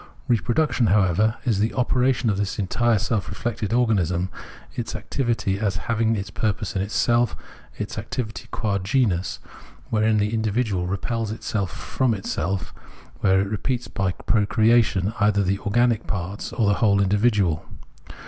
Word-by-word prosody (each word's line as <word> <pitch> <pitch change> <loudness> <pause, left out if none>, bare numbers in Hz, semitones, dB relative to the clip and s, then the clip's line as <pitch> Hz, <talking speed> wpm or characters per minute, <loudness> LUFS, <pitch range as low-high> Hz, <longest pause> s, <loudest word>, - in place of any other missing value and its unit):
Reproduction, 125 +1 +2
however, 100 +2 +3
is 110 -6 +1
the 110 +2 0
operation 125 -2 +2
of 100 - -1
this 100 -1 -2
entire 115 +4 +2
self 105 +1 -1
reflected 110 -3 -3
organism, 95 -7 +1 0.4
its 120 -2 -4
activity 115 -3 -1
as 100 -3 0
having 115 -1 +1
its 100 0 -4
purpose 105 -2 -2
in 95 - +1
itself, 120 +4 +1 0.4
its 105 0 -4
activity 110 +1 -5
qua 100 -3 -1
genus, 95 -2 0 0.5
wherein 110 0 +3
the 105 +1 0
individual 110 -4 0
repels 110 +4 -2
itself 110 -3 -2
from 125 +4 -1
itself, 95 -1 -3 0.5
where 95 0 +3
it 100 - -1
repeats 120 +3 -2
by 95 -3 -1
procreation 110 -1 +2
either 100 -1 +3
the 100 +1 0
organic 115 +2 +1
parts 95 0 -4
or 115 - 0
the 100 - +2
whole 100 -3 +4
individual. 100 -4 +2
105 Hz, 140 wpm, -23 LUFS, 100-115 Hz, 0.5 s, whole